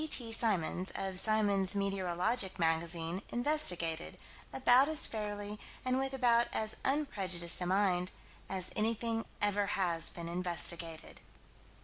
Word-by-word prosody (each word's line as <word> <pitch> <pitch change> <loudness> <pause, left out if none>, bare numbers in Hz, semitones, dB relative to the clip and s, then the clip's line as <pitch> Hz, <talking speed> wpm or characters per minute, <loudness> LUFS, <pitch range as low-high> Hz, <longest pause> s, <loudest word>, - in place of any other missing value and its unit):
G.T. 255 -7 +2
Symons, 190 -5 -1
of 190 -1 +4
Symons' 205 -2 +2
Meteorological 195 +1 0
Magazine, 165 +2 -1
investigated, 185 - 0 0.3
about 260 +1 +4
as 315 0 +2
fairly, 210 -1 -5 0.3
and 255 0 +1
with 270 0 -2
about 240 -2 +3
as 215 0 0
unprejudiced 190 - 0
a 180 - -2
mind, 185 -1 +1 0.4
as 185 -1 -2
anything 225 +1 -1 0.2
ever 205 0 +1
has 170 -4 +3
been 170 -1 -7
investigated. 170 -2 -1
195 Hz, 115 wpm, -32 LUFS, 175-230 Hz, 0.4 s, of